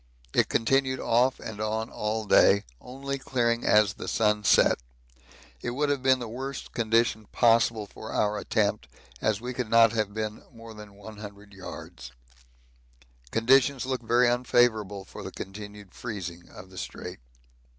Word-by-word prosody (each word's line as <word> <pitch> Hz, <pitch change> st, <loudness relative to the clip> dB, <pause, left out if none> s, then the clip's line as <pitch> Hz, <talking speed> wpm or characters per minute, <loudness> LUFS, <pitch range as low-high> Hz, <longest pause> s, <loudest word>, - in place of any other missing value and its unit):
It -, -, +2 dB
continued 130 Hz, +2 st, +1 dB
off 125 Hz, +3 st, +2 dB
and 105 Hz, -1 st, -7 dB
on 110 Hz, +1 st, -2 dB
all 110 Hz, +1 st, -2 dB
day, 100 Hz, 0 st, +5 dB, 0.2 s
only 140 Hz, +2 st, -6 dB
clearing 120 Hz, -3 st, 0 dB
as 105 Hz, -3 st, +4 dB
the -, -, -8 dB
sun 105 Hz, -1 st, +1 dB
set. -, -, +4 dB, 0.8 s
It -, -, -3 dB
would 145 Hz, +1 st, 0 dB
have 140 Hz, -2 st, 0 dB
been 130 Hz, 0 st, +4 dB
the 120 Hz, -2 st, -6 dB
worst 130 Hz, +4 st, -6 dB
condition 115 Hz, -2 st, +1 dB
possible 115 Hz, -2 st, +3 dB
for 110 Hz, +2 st, -10 dB
our 105 Hz, 0 st, 0 dB
attempt, -, -, 0 dB, 0.3 s
as 110 Hz, -2 st, +1 dB
we 125 Hz, +1 st, -4 dB
could 125 Hz, -3 st, -4 dB
not 115 Hz, -1 st, +6 dB
have 110 Hz, -3 st, -1 dB
been 110 Hz, 0 st, -4 dB
more 115 Hz, -2 st, -12 dB
than 105 Hz, -2 st, -12 dB
100 105 Hz, -1 st, -11 dB
yards. 65 Hz, -9 st, -9 dB, 1.2 s
Conditions 130 Hz, -, +3 dB
look 130 Hz, -2 st, -2 dB
very 120 Hz, +2 st, +3 dB
unfavourable 120 Hz, -5 st, +1 dB
for -, -, -10 dB
the -, -, -7 dB
continued 105 Hz, 0 st, -9 dB
freezing 90 Hz, -7 st, -7 dB
of 95 Hz, +1 st, -13 dB
the 95 Hz, -, -8 dB
Strait. -, -, -7 dB
110 Hz, 150 wpm, -27 LUFS, 105-125 Hz, 1.2 s, not